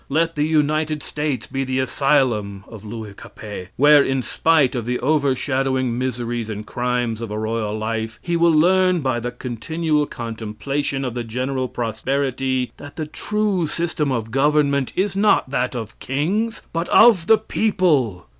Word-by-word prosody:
Let 165 +3 +1
the 150 - -2
United 155 0 +1
States 150 -3 -3
be 135 +1 -3
the 130 0 -2
asylum 130 -7 +1
of 110 -3 -11
Louis 110 -1 -7
Capet, 100 -2 -9
where, 145 +1 +7
in 135 -1 -1
spite 155 -3 +2
of 120 -3 -3
the 125 0 0
overshadowing 135 -3 0
miseries 120 -2 -3
and 105 0 -5
crimes 120 -1 -2
of 115 - -4
a 105 - -4
royal 110 -1 -2
life, 110 0 -3
he 170 -1 -2
will 170 0 +4
learn 180 +2 +4
by 130 -3 0
the 120 +1 -3
continual 150 +6 -2
contemplation 120 +4 -3
of 125 - -3
the 120 0 -3
general 130 +3 -2
prosperity 130 +2 -1
that 145 0 -11
the 155 - -3
true 200 +1 -1
system 160 -3 -1
of 115 -3 -2
government 140 0 +2
is 190 +1 0
not 200 -9 +3
that 125 -1 -1
of 115 -3 -6
kings, 200 - -1
but 165 +1 -2
of 220 -8 +6
the 220 - +7
people. 170 - +1
135 Hz, 160 wpm, -21 LUFS, 115-155 Hz, -, where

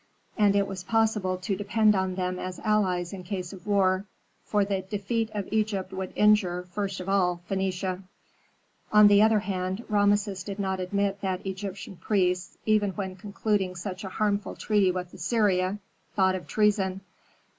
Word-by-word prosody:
And 205 -2 +3
it 200 0 +3
was 190 -2 -6
possible 215 -3 +1
to 185 +2 -2
depend 210 +2 +3
on 190 -1 0
them 180 0 -2
as 185 -1 -5
allies 185 -5 +1
in 190 - -6
case 180 0 -5
of 190 +2 -12
war, 195 -1 +2 0.4
for 205 -1 +1
the 195 -1 -1
defeat 205 +4 -2
of 205 -3 -4
Egypt 205 -3 -1
would 190 -1 -4
injure, 210 -4 +3
first 195 -1 -3
of 185 - -7
all, 180 -3 +1
Phœnicia. 190 -1 -2 0.9
On 210 0 +8
the 205 0 +6
other 220 -1 +4
hand, 190 +2 -3
Rameses 205 -2 +2
did 200 0 -6
not 190 -2 -1
admit 200 +2 -1
that 190 -2 -2
Egyptian 195 0 -6
priests, 180 -3 0
even 210 -3 +2
when 190 0 -4
concluding 200 -1 -1
such 185 +2 -6
a 190 - -5
harmful 205 +1 -1
treaty 205 -3 +2
with 180 -1 -5
Assyria, 190 0 +1 0.4
thought 190 -2 +3
of 185 -1 -5
treason. 200 -3 +1
195 Hz, 165 wpm, -27 LUFS, 185-205 Hz, 0.9 s, On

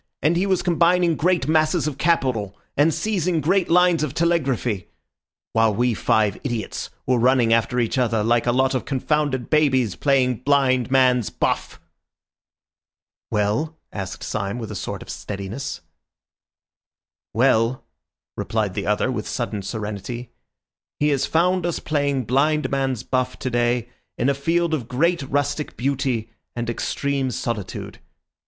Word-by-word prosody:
And 155 +4 +3
he 185 +3 +1
was 190 -2 +1
combining 175 -1 +3
great 175 -2 +1
masses 155 +1 +2
of 150 -3 -3
capital, 125 - +1 0.2
and 150 +3 +4
seizing 180 -3 0
great 180 +4 +1
lines 180 -1 +4
of 150 -3 -2
telegraphy, 135 - 0 0.7
while 110 -2 +3
we 120 +1 +2
five 105 -1 +1
idiots 120 -6 -3 0.2
were 125 -1 +2
running 120 -1 +4
after 115 +2 +1
each 120 +2 0
other 115 -3 +1
like 120 +2 +2
a - - +4
lot 130 +2 +2
of 130 - -1
confounded 135 -2 -1
babies 130 - +3
playing 130 -4 +2
blind 130 -3 +2
man's 125 -3 +3
buff." - - -2 1.5
"Well?" 110 +10 0 0.2
asked 95 -2 -5
Syme 100 +1 -3
with 110 -3 -6
a - - -5
sort - - -5
of - - -17
steadiness. 100 0 -5 1.5
"Well," 120 +1 +2 0.5
replied 110 -3 -1
the 100 +1 -3
other 105 +5 +1
with 110 -4 -4
sudden 115 -4 -3
serenity, 105 +3 -5 0.7
"he 150 - +3
has 140 -2 +1
found 180 +2 +2
us 175 -1 -1
playing 140 -3 0
blind 150 +5 +1
man's 135 -4 -1
buff 130 -1 -1
today 120 -1 0 0.3
in 125 - +1
a - - +3
field 165 +4 0
of 130 -8 -2
great 170 +8 +1
rustic 145 +2 -2
beauty 125 -4 -1 0.2
and 120 0 -2
extreme 140 +2 -1
solitude. 115 -4 -4
130 Hz, 140 wpm, -22 LUFS, 115-155 Hz, 1.5 s, and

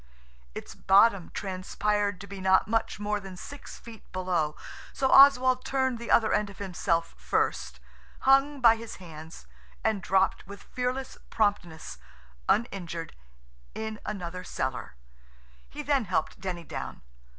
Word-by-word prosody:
Its - - -7
bottom 200 -1 +4
transpired 200 +1 -1
to 200 - -8
be 200 -1 -9
not 190 0 +4
much 225 -1 -1
more 210 0 -1
than 190 -2 -10
six 285 +9 -9
feet 230 -3 -12
below, 180 -5 -1 0.4
so 265 -1 +1
Oswald 260 -2 +7
turned 260 -3 0
the 235 - -7
other 220 -2 +4
end 210 -1 +1
of 200 - -13
himself 175 -3 -1
first, - - -1 0.4
hung 275 +2 +4
by 230 -2 +7
his 230 0 -8
hands, 160 -2 -11 0.4
and 220 -3 +1
dropped 190 +1 +1
with 200 0 -10
fearless 255 +1 -4
promptness, 175 - -1 0.5
uninjured, 175 -7 -1 0.6
in 220 0 -5
another 180 -3 -5
cellar. 130 - -4 0.7
He 295 - -7
then 280 -5 +1
helped 180 -4 -1
Denny 180 -3 -4
down. - - -7
200 Hz, 135 wpm, -28 LUFS, 180-230 Hz, 0.7 s, Oswald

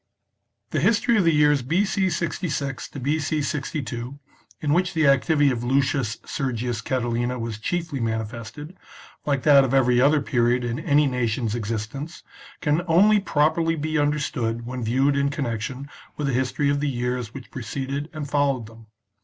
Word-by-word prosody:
The - - 0
history 225 - +3
of 190 - +3
the 165 - +5
years 150 -2 +4
B.C. 190 +7 +1
66 155 -5 -3
to 140 - -8
B.C. 150 +2 0
62, 135 -3 -4 0.4
in 150 -1 0
which 180 +1 +1
the 160 -1 +3
activity 140 +1 +4
of 120 -1 -3
Lucius 135 -3 +1
Sergius 120 -4 -2
Catilina 120 0 -1
was 115 -2 -4
chiefly 165 +3 -2
manifested, 115 - -4 0.5
Hke 140 -3 0
that 140 -2 +7
of 135 0 0
every 125 -2 +4
other 145 +3 +4
period 125 -3 +1
in 120 0 -2
any 145 +1 +3
nation's 120 -4 -1
existence, 115 +7 -4 0.4
can 150 +1 +2
only 205 +6 +5
properly 165 -2 +1
be 155 0 -1
understood 135 -6 -1
when 125 0 -5
viewed 135 +5 +2
in 140 0 +2
connection 130 -1 -4 0.3
with 150 - -2
the 135 - 0
history 130 +3 +1
of 145 - 0
the 145 0 0
years 125 -2 -2
which 130 0 -10
preceded 135 +4 -4
and 155 -2 -5
followed 140 -4 +1
them. 115 0 -15
140 Hz, 160 wpm, -24 LUFS, 120-150 Hz, 0.5 s, that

